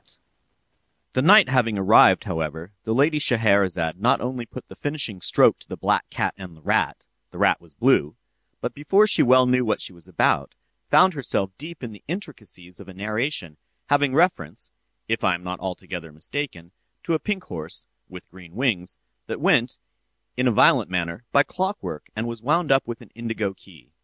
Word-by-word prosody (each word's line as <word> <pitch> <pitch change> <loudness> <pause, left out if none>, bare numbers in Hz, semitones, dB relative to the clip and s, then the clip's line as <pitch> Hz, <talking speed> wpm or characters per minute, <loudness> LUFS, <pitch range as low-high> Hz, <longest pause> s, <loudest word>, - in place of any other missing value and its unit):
The 130 - +1
night 195 +6 +7
having 120 -5 +1
arrived, 100 +3 +6
however, 80 -2 -4
the 110 - 0
lady 150 +4 +3
Scheherazade 100 - +2
not 120 - +3
only 125 -1 -4
put 130 - -10
the - - -12
finishing 145 -10 -3
stroke - - +4
to - - -15
the - - -6
black - - 0
cat - - -2
and 90 -4 -10
the - - -19
rat - - 0 0.2
(the - - -13
rat - - +3
was 80 -4 -21
blue) 75 +1 +2 0.5
but - - -3
before 195 +9 +3
she 215 - +3
well 130 +1 +5
knew 125 0 +2
what 110 - 0
she - - -4
was 85 0 -17
about, 95 - 0 0.3
found 185 - +5
herself 115 -9 -2
deep 160 0 -9
in 120 - -5
the 105 - -13
intricacies 105 - -7
of 100 - -12
a 95 - -11
narration, 105 - -3 0.3
having 145 -2 +2
reference 155 - 0 0.4
(if 115 +1 -1
I 90 - +3
am 90 - -9
not 90 0 -5
altogether 90 -3 -6
mistaken) 85 - -6 0.3
to 170 - -1
a 160 - +1
pink 200 -1 -3
horse 80 - -6 0.2
(with 90 0 -11
green 90 -2 -15
wings) 110 -8 -1 0.3
that - - -4
went, - - +2 0.6
in 125 +1 +1
a - - +4
violent 105 - +4
manner, 90 +4 -3
by 140 - +5
clockwork, 190 - -4
and 110 +2 -3
was 115 -2 -6
wound 155 +4 +1
up 135 -2 +3
with 120 -1 -6
an - - -19
indigo 115 -3 -3
key. 60 -8 -19
110 Hz, 185 wpm, -23 LUFS, 90-140 Hz, 0.6 s, night